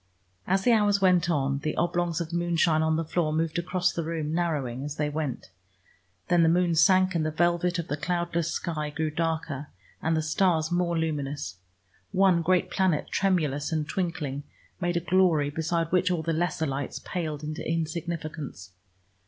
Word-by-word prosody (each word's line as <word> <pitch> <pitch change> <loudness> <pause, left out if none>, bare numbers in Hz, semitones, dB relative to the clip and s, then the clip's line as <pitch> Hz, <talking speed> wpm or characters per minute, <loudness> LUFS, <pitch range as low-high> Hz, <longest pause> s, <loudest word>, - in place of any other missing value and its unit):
As 190 +1 +2
the 245 - +4
hours 205 -3 +4
went 180 -2 +3
on 140 -3 +1
the 155 +1 -3
oblongs 175 -1 0
of 170 -1 -4
moonshine 170 -2 +2
on 160 0 +2
the 165 +1 -1
floor 160 -1 0
moved 160 +2 0
across 180 +1 0
the 170 - -2
room, 160 -1 -3
narrowing 145 -7 -1
as 145 0 -4
they 150 -1 -1
went. 145 -9 -4 0.8
Then 175 -1 +4
the 165 - +5
moon 175 0 +3
sank 185 +3 +4
and 165 -2 +1
the 155 - 0
velvet 175 +2 +1
of 170 -1 -3
the 145 - -2
cloudless 170 +1 -1
sky 155 -3 -3
grew 155 +1 -2
darker, 155 -3 -2 0.3
and 160 0 +1
the 160 - 0
stars 160 0 +1
more 175 -1 +1
luminous. 145 - -3 0.5
One 190 -3 +4
great 180 +2 +1
planet, 185 -6 +1
tremulous 155 -7 +1
and 155 -2 -1
twinkling, 165 -7 -2 0.4
made 175 -1 0
a - - 0
glory 170 -5 +3
beside 165 +2 -1
which 185 0 +3
all 175 -3 0
the 165 +1 0
lesser 160 -1 0
lights 140 -1 -3
paled 155 -4 -4
into 155 +1 -4
insignificance. 160 - -4
165 Hz, 175 wpm, -27 LUFS, 155-175 Hz, 0.8 s, the